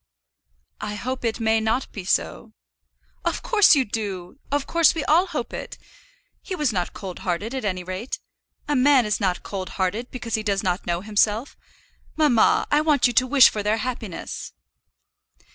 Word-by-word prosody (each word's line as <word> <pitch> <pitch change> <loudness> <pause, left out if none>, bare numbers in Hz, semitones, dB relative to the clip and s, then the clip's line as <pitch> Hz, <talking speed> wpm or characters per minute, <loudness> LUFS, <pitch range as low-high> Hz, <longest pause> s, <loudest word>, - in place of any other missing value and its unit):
"I 210 0 -4
hope 255 +4 -4
it 230 0 -1
may 225 0 +2
not 220 +4 -1
be 195 -4 -7
so." 85 - -1 0.7
"Of - - -2
course 415 -8 +5
you 270 -2 +2
do; 200 -1 -5
of 285 -1 0
course 335 -1 +3
we 320 - -2
all 340 +5 +4
hope 300 -9 -4
it. - - -6 0.6
He 375 - -5
was 295 -9 0
not 180 -2 -2
cold 190 -3 -7
hearted, 195 +6 -3
at 265 - -3
any 185 -3 -2
rate. 185 +7 -5 0.5
A 295 - +1
man 260 -1 +5
is 210 - 0
not 185 -4 -1
cold 190 -2 -5
hearted, 200 +6 -1
because 240 -3 -7
he 220 - +1
does 200 -2 -1
not 180 0 -1
know 175 0 -1
himself. 215 +4 0 0.6
Mamma, 290 -8 +3
I 295 +1 +4
want 295 -5 +3
you 245 - +3
to 255 +2 +3
wish 270 -1 +7
for 210 - -3
their 210 +2 +1
happiness." 225 -5 -5
225 Hz, 180 wpm, -23 LUFS, 195-270 Hz, 0.7 s, wish